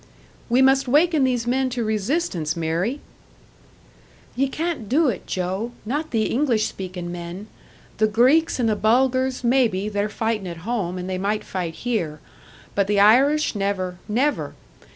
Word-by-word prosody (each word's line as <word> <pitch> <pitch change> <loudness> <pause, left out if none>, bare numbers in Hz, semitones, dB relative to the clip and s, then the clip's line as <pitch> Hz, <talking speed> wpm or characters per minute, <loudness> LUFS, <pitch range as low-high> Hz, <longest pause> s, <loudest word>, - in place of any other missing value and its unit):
"We 250 +3 +4
must 270 0 +4
waken 300 +2 +3
these 245 -3 0
men 260 +2 +1
to 245 -2 -2
resistance, 215 - -1
Mary!" 170 - -1 1.3
"Ye 275 +2 +1
can't 310 - -3
do 300 +2 +3
it, 200 - -5
Joe 190 +6 -3
not 295 +7 -2
the 225 -2 +1
English 235 -3 +1
speakin' 180 -2 -6
men. 175 +3 -7 0.5
The 215 - +4
Greeks 260 +9 +3
and 235 - +2
the 215 - +2
Bulgars, 255 +4 +1
maybe 235 -5 +2
they're 205 0 -1
fightin' 220 -2 -2
at 170 0 -8
home, 200 -7 -2
and 180 0 -5
they 185 -1 -3
might 210 +2 -1
fight 175 -4 -4
here. 180 -11 -2 0.5
But 200 -1 +1
the 205 0 +2
Irish 270 +9 +4
never 195 -3 -2
never! 265 +7 0
220 Hz, 150 wpm, -23 LUFS, 190-260 Hz, 1.3 s, We